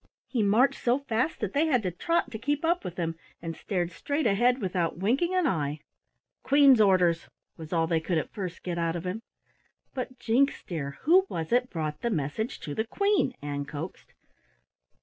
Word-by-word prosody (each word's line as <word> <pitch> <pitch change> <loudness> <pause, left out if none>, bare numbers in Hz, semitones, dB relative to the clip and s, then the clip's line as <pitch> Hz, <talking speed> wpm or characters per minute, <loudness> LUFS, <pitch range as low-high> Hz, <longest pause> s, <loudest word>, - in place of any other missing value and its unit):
He 245 - -1
marched 215 +6 +3
so 245 +1 +3
fast 275 +1 -1
that 210 -3 -2
they 305 +3 +2
had 255 -7 +2
to 185 - -1
trot 335 - 0
to 220 - -5
keep 290 +6 -1
up 345 +2 +1
with 180 -1 -6
him, 165 -2 -2 0.2
and 165 -1 -5
stared 180 -3 -2
straight 285 - -2
ahead 240 +5 +3
without 180 -6 -1
winking 270 - +1
an 365 -2 +2
eye. 150 - -1 0.6
"Queen's 275 -4 +6
orders," 180 -4 +3 0.3
was 160 -2 -10
all 165 -2 +2
they 165 0 +1
could 165 +1 -1
at 155 - -3
first 185 -4 -5
get 175 -2 -3
out 165 0 0
of 170 +1 -5
him. 185 +5 -3 0.7
"But, 255 -1 -5
Jinks, 255 +5 +1
dear, 140 -5 -5
who 370 +6 +5
was 160 -1 -4
it 250 +1 +2
brought 155 -3 -4
the 235 - 0
message 200 - -2
to 145 - -5
the 220 +8 -2
Queen?" 400 - +1
Ann 145 -1 -3
coaxed. 155 +5 -8
205 Hz, 190 wpm, -28 LUFS, 165-265 Hz, 0.7 s, Queen's